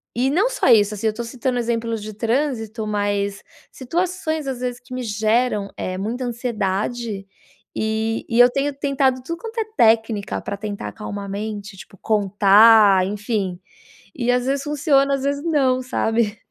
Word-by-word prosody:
e 255 Hz, +3 st, +1 dB
não 385 Hz, +9 st, +3 dB
só -, -, -1 dB
isso, 210 Hz, -3 st, +5 dB
assim, 220 Hz, +2 st, -2 dB
eu 215 Hz, -, +1 dB
tô 235 Hz, +2 st, -5 dB
citando 250 Hz, +1 st, -2 dB
exemplos 230 Hz, -1 st, -1 dB
de 215 Hz, +1 st, -7 dB
trânsito, 225 Hz, -1 st, -2 dB
mas 205 Hz, -1 st, -1 dB, 0.3 s
situações 320 Hz, +2 st, -2 dB
às 260 Hz, -2 st, -3 dB
vezes 245 Hz, -1 st, -3 dB
que 255 Hz, 0 st, -13 dB
me 255 Hz, -, -3 dB
geram, 215 Hz, 0 st, 0 dB
eh, 185 Hz, 0 st, -3 dB
muita 230 Hz, +6 st, -3 dB
ansiedade 220 Hz, -2 st, -3 dB, 0.5 s
e 220 Hz, +1 st, -1 dB
e 230 Hz, -, +1 dB
eu 245 Hz, -, +9 dB
tenho 275 Hz, +3 st, -1 dB
tentado 275 Hz, -2 st, 0 dB
tudo 335 Hz, +4 st, -4 dB
quanto 455 Hz, 0 st, -8 dB
é 440 Hz, -, 0 dB
técnica 225 Hz, -2 st, +2 dB
pra -, -, -4 dB
tentar 205 Hz, -1 st, -5 dB
acalmar 205 Hz, -2 st, -7 dB
a 195 Hz, -, -8 dB
mente, 205 Hz, 0 st, -5 dB
tipo 195 Hz, -, -13 dB
contar, 205 Hz, -1 st, +5 dB
enfim, 205 Hz, -3 st, -3 dB, 0.6 s
e 245 Hz, -1 st, -2 dB
às 250 Hz, 0 st, +1 dB
vezes 275 Hz, +1 st, -1 dB
funciona, 280 Hz, -2 st, +2 dB
às 270 Hz, -, -5 dB
vezes 280 Hz, +1 st, -1 dB
não, 270 Hz, -6 st, +2 dB
sabe? 225 Hz, -3 st, 0 dB
230 Hz, 165 wpm, -21 LUFS, 210-260 Hz, 0.6 s, eu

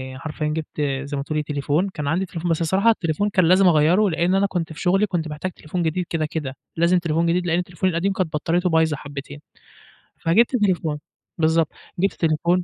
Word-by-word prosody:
حرفيًا 150 Hz, +2 st, -4 dB
جبت 150 Hz, -1 st, -4 dB, 0.2 s
زَي 145 Hz, 0 st, -4 dB
ما 140 Hz, -, -2 dB
تقولي 155 Hz, 0 st, -2 dB
تليفون، 150 Hz, +5 st, -1 dB
كان 150 Hz, -5 st, -5 dB
عندي 175 Hz, +6 st, 0 dB
تليفون، 165 Hz, 0 st, -3 dB
بس 165 Hz, -, 0 dB
الصراحة 190 Hz, +7 st, +3 dB
التليفون 200 Hz, -1 st, +1 dB
كان 185 Hz, -3 st, +3 dB
لازم 185 Hz, +2 st, +5 dB
أغيّره، 175 Hz, +6 st, +4 dB
لإن 175 Hz, +3 st, +1 dB
أنا 200 Hz, +1 st, +3 dB
كنت 165 Hz, -4 st, -3 dB
في -, -, -10 dB
شغلي 195 Hz, +3 st, +3 dB
كنت 170 Hz, -4 st, -2 dB
محتاج 155 Hz, +5 st, -4 dB
تليفون 170 Hz, +2 st, -4 dB
جديد 170 Hz, +3 st, -1 dB
كده 160 Hz, -2 st, -1 dB
كده، 150 Hz, -4 st, -4 dB, 0.2 s
لازم 170 Hz, +2 st, +4 dB
تليفون 165 Hz, 0 st, 0 dB
جديد 175 Hz, +1 st, +1 dB
لإن 170 Hz, +2 st, +1 dB
تليفوني 180 Hz, +1 st, -1 dB
القديم 185 Hz, +4 st, 0 dB
كانت 180 Hz, -4 st, -2 dB
بطّاريته 175 Hz, +4 st, 0 dB
بايظة 160 Hz, -3 st, +2 dB
حبتين. 145 Hz, 0 st, -8 dB, 0.8 s
فجبت 230 Hz, +10 st, +3 dB
تليفون. 175 Hz, -8 st, 0 dB, 0.4 s
بالضبط، 160 Hz, 0 st, +2 dB, 0.3 s
جبت 195 Hz, +2 st, +2 dB
تليفون 170 Hz, +3 st, +1 dB
165 Hz, 195 wpm, -22 LUFS, 155-185 Hz, 0.8 s, لازم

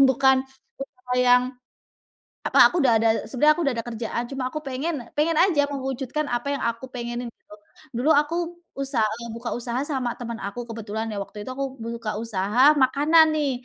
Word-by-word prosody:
bukan 265 Hz, 0 st, +4 dB, 0.4 s
usaha 250 Hz, -2 st, -8 dB
yang 250 Hz, 0 st, +5 dB, 1.0 s
apa, -, -, +6 dB
aku 355 Hz, -, -5 dB
udah 245 Hz, -, +5 dB
ada 225 Hz, -, +3 dB, 0.2 s
sebenernya 300 Hz, +4 st, +3 dB
aku 345 Hz, -, -1 dB
udah 275 Hz, -, +2 dB
ada -, -, -1 dB
kerjaan 235 Hz, +1 st, -3 dB
cuma 270 Hz, -1 st, -5 dB
aku 305 Hz, -, -3 dB
pengen 270 Hz, -1 st, -4 dB
pengen 310 Hz, +2 st, +2 dB
aja 335 Hz, -6 st, +4 dB
mewujudkan 270 Hz, +2 st, -3 dB
apa 245 Hz, +4 st, -1 dB
yang 280 Hz, -, -2 dB
aku 235 Hz, +2 st, -2 dB
pengenin 240 Hz, -1 st, -5 dB
gitu. 210 Hz, -, -17 dB, 0.4 s
Dulu 275 Hz, +6 st, +1 dB
aku 300 Hz, +3 st, +2 dB, 0.4 s
usaha, 270 Hz, -6 st, 0 dB, 0.3 s
buka 235 Hz, +1 st, -5 dB
usaha 240 Hz, +1 st, -3 dB
sama 255 Hz, -4 st, -1 dB
temen 235 Hz, -1 st, -5 dB
aku 200 Hz, +5 st, -5 dB
kebetulan 220 Hz, 0 st, -4 dB
ya, 210 Hz, -, -5 dB
waktu 210 Hz, -, -11 dB
itu 255 Hz, -, -7 dB
aku 275 Hz, -, -1 dB
buka 225 Hz, -2 st, -4 dB
usaha 215 Hz, +1 st, -1 dB, 0.2 s
makanan 310 Hz, +4 st, +4 dB
nih. 295 Hz, -3 st, +1 dB
250 Hz, 175 wpm, -24 LUFS, 230-285 Hz, 1.0 s, apa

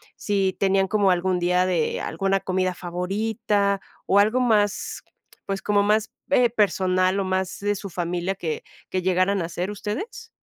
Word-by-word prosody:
si 195 Hz, -2 st, 0 dB
tenían 195 Hz, 0 st, +2 dB
como 200 Hz, -1 st, +3 dB
algún 180 Hz, 0 st, +1 dB
día 180 Hz, +1 st, +2 dB
de 175 Hz, -4 st, 0 dB
alguna 195 Hz, +3 st, 0 dB
comida 185 Hz, -1 st, -1 dB
favorita, 200 Hz, +3 st, -1 dB, 0.2 s
o 200 Hz, -, +4 dB
algo 215 Hz, +5 st, +3 dB
más, 210 Hz, -5 st, +1 dB, 0.4 s
pues 195 Hz, 0 st, -3 dB
como 205 Hz, 0 st, +2 dB
más 215 Hz, +1 st, +1 dB, 0.2 s
eh, 250 Hz, -4 st, +5 dB
personal 190 Hz, -3 st, +2 dB
o -, -, +1 dB
más 190 Hz, 0 st, -2 dB
de 205 Hz, 0 st, 0 dB
su 200 Hz, 0 st, -6 dB
familia 175 Hz, +1 st, -2 dB
que 165 Hz, -4 st, -4 dB, 0.3 s
que 185 Hz, -, -1 dB
llegaran 185 Hz, +2 st, +2 dB
a -, -, -1 dB
hacer 175 Hz, +3 st, -3 dB
ustedes? 215 Hz, -, -5 dB
195 Hz, 160 wpm, -24 LUFS, 185-205 Hz, 0.4 s, eh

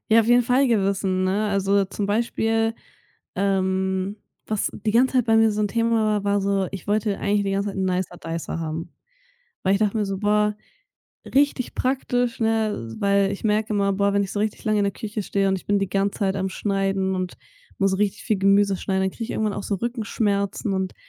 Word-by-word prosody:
Ja, 225 Hz, +1 st, +6 dB
auf 220 Hz, -, -1 dB
jeden 245 Hz, +1 st, +5 dB
Fall 255 Hz, +3 st, +3 dB
Gewissen, 195 Hz, -3 st, +1 dB
ne? 200 Hz, +3 st, +1 dB
Also, 200 Hz, 0 st, +2 dB
zum 200 Hz, +1 st, -3 dB
Beispiel, 225 Hz, +1 st, 0 dB, 0.6 s
ähm, 190 Hz, 0 st, 0 dB, 0.3 s
was 215 Hz, -2 st, -1 dB
die 215 Hz, +1 st, -2 dB
ganze 255 Hz, +3 st, +3 dB
Zeit 250 Hz, -, +3 dB
bei 225 Hz, -, +4 dB
mir 225 Hz, 0 st, +5 dB
so 210 Hz, -, -2 dB
'n 210 Hz, -, +1 dB
Thema 230 Hz, 0 st, +1 dB
war, 210 Hz, -1 st, 0 dB
war 200 Hz, 0 st, +2 dB
so, 195 Hz, -1 st, 0 dB
ich 195 Hz, -3 st, -7 dB
wollte 210 Hz, -1 st, 0 dB
eigentlich 205 Hz, 0 st, +1 dB
die 195 Hz, -, -1 dB
ganze 200 Hz, +1 st, 0 dB
Zeit 195 Hz, -, -9 dB
'n 190 Hz, -, 0 dB
Nicer 180 Hz, -1 st, -1 dB
Dicer 165 Hz, 0 st, -4 dB
haben, 160 Hz, +1 st, -5 dB, 0.7 s
weil 190 Hz, +1 st, +3 dB
ich 200 Hz, -, +1 dB
dachte 215 Hz, 0 st, +1 dB
mir 210 Hz, -, +1 dB
so: 195 Hz, -1 st, -3 dB
„Boah, 210 Hz, +1 st, +2 dB, 0.7 s
richtig 275 Hz, -2 st, +1 dB
praktisch“, 245 Hz, -2 st, 0 dB
ne? 220 Hz, -, 0 dB
Weil 200 Hz, 0 st, +2 dB
ich 200 Hz, -, -6 dB
merke 215 Hz, 0 st, +1 dB
immer: 200 Hz, -1 st, +1 dB
„Boah, 200 Hz, +1 st, +1 dB
wenn 200 Hz, 0 st, +2 dB
ich 190 Hz, -, -5 dB
so 205 Hz, -, -3 dB
richtig 215 Hz, 0 st, -2 dB
lange 215 Hz, -1 st, +2 dB
in -, -, +2 dB
der 200 Hz, -, 0 dB
Küche 210 Hz, -1 st, -5 dB
stehe 195 Hz, 0 st, 0 dB
und 190 Hz, -, +2 dB
ich -, -, -12 dB
bin 205 Hz, -1 st, +2 dB
die 195 Hz, -, -2 dB
ganze 195 Hz, 0 st, -1 dB
Zeit 195 Hz, -2 st, +1 dB
am 190 Hz, 0 st, -1 dB
Schneiden 195 Hz, -1 st, -1 dB
und 185 Hz, -1 st, -3 dB, 0.4 s
muss 195 Hz, -1 st, +1 dB
richtig 205 Hz, -1 st, -1 dB
viel 215 Hz, -, +1 dB
Gemüse 195 Hz, +1 st, +3 dB
schneiden, 190 Hz, 0 st, -1 dB
dann 190 Hz, -, 0 dB
kriege 230 Hz, -, -6 dB
ich -, -, -6 dB
irgendwann 215 Hz, -1 st, -1 dB
auch -, -, -5 dB
so 200 Hz, -, -1 dB
Rückenschmerzen“ 205 Hz, -3 st, -1 dB
und 190 Hz, -1 st, -2 dB
200 Hz, 220 wpm, -23 LUFS, 195-215 Hz, 0.7 s, Ja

